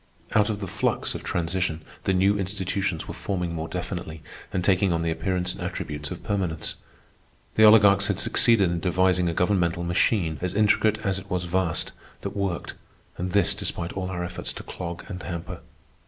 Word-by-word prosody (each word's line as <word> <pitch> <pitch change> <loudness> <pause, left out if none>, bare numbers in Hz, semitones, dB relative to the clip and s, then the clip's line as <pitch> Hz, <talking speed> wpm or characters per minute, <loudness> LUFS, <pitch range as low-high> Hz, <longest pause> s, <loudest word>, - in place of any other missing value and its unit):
Out 105 +1 +4
of 105 -2 -2
the - - -2
flux - - -1
of - - -6
transition 85 -1 -1 0.2
the - - +3
new 95 +2 +4
institutions 95 -2 -2
were - - -5
forming 90 -4 -2
more 80 0 -3
definitely 80 -1 -5 0.3
and 90 -1 -1
taking 95 0 +3
on 85 -1 0
the 85 - 0
appearance 90 +1 -1
and - - -10
attributes 75 -1 -4
of - - -7
permanence. 90 -6 -2 0.8
The 110 - +6
oligarchs 105 -3 +7
had - - 0
succeeded 100 -7 +4
in 85 - -1
devising 90 0 +2
a - - -1
governmental 90 -2 +1
machine, 85 -2 +1
as 90 +1 -2
intricate 110 0 +3
as 95 -2 0
it 95 0 -13
was 90 -2 -1
vast, 85 -1 0 0.3
that - - -5
worked—and 90 -1 -5
this 100 0 +4
despite 95 -4 -4
all 95 -1 -3
our 90 -1 -3
efforts 90 +1 -4
to - - -8
clog 85 -1 -6
and 90 -3 -6
hamper. 85 0 -5
90 Hz, 180 wpm, -25 LUFS, 85-100 Hz, 0.8 s, oligarchs